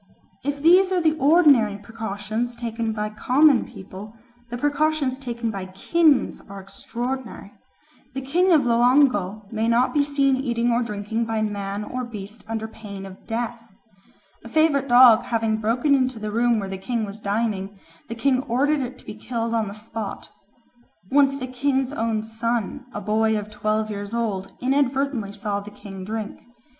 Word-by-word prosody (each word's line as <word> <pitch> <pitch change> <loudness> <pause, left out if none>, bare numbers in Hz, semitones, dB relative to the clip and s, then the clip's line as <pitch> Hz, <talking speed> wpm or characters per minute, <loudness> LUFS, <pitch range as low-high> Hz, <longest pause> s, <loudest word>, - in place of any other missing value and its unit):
If 285 +1 -3
these 370 +3 +6
are 370 - +2
the 315 -2 +2
ordinary 280 - +5
precautions 220 +2 -4
taken 230 -1 -3
by 210 -1 -3
common 260 +5 +4
people, 195 +3 -10 0.3
the 240 - -4
precautions 290 -1 0
taken 235 -3 -3
by 195 -3 -5
kings 295 - +2
are 200 0 -8
extraordinary. 240 +3 -6 0.6
The 270 - -3
king 355 +8 +2
of 315 -4 +6
Loango 235 -4 +3
may 225 0 -1
not 235 +2 +2
be 290 -2 +3
seen 280 -2 +2
eating 240 -2 0
or 235 +1 +2
drinking 220 0 -2
by 225 -1 -1
man 205 -1 -3
or 255 +4 -4
beast 210 -2 -8
under 220 0 -3
pain 205 -3 -9
of 190 -1 -13
death. 235 +1 -3 0.8
A 230 - -10
favourite 295 -1 +2
dog 245 -2 +8
having 225 -2 0
broken 235 +7 +1
into 255 -3 +1
the 215 -1 -4
room 235 +1 +2
where 195 - -4
the 190 0 -6
king 225 +3 -2
was 205 +1 -9
dining, 205 -2 -2 0.3
the 230 - -4
king 255 +2 +2
ordered 280 +5 +2
it 255 0 -5
to - - -16
be - - -7
killed 230 +1 -3
on 225 -2 0
the 200 - -7
spot. 215 -1 -6 0.8
Once 275 0 +4
the 255 - -4
king's 265 +1 -1
own 225 -4 -1
son, 230 +3 -3
a 205 - -5
boy 220 +1 +1
of 210 0 -6
twelve 215 +1 -1
years 205 +2 -5
old, 205 -5 -2
inadvertently 265 -4 0
saw 205 0 -3
the 205 +1 -9
king 195 -2 -10
drink. 215 +1 -5
230 Hz, 170 wpm, -23 LUFS, 210-265 Hz, 0.8 s, dog